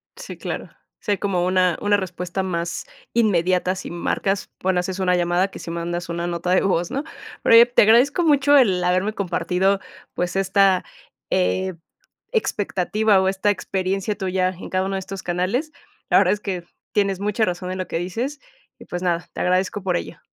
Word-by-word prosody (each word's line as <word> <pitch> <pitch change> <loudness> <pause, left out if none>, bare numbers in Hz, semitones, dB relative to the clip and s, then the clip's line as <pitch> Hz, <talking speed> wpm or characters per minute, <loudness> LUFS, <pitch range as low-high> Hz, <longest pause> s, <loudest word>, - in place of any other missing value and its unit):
Sí, - - -9
claro. - - -5 0.3
Si - - -3
hay 200 - +2
como 185 -3 0
una 185 -2 +2
una 205 0 +3
respuesta 185 -1 -4
más 170 -2 -3 0.3
inmediata 185 -4 +2
si 190 - -7
marcas, 190 +3 -1
bueno, 185 -1 +1
haces 185 +2 -3
una 180 -1 +2
llamada 175 +2 +1
que - - -10
si - - -8
mandas 170 +1 -3
una 170 0 -3
nota 175 +1 -2
de 185 - +4
voz, 175 -3 0
¿no? 275 - -2 0.4
Oye, 230 +1 +8
te 245 0 +3
agradezco 245 +10 +5
mucho 290 -2 +4
el 195 -9 +4
haberme 185 +4 +1
compartido, 190 0 0 0.3
pues, 180 +1 -2
esta, 195 -1 +3 0.4
eh, 185 0 +1 0.6
expectativa 210 - +1
o 190 - +1
esta 195 +2 +1
experiencia 195 0 -1
tuya 185 -1 0
en 185 0 -8
cada 185 0 0
uno 195 0 -2
de - - -1
estos 190 0 -7
canales. 185 - -1 0.4
La - - +5
verdad - - +4
es 210 - -3
que 185 -4 -4 0.3
tienes 200 -3 +1
mucha 210 +2 0
razón 180 0 -3
en 185 - -4
lo 185 - -3
que - - -2
dices. 235 +12 -3 0.4
Y, - - -12
pues, 175 - -5
nada, 175 -1 0
te - - -4
agradezco 185 +2 0
por 180 -2 +1
ello. 160 - -8
185 Hz, 185 wpm, -22 LUFS, 180-205 Hz, 0.6 s, Oye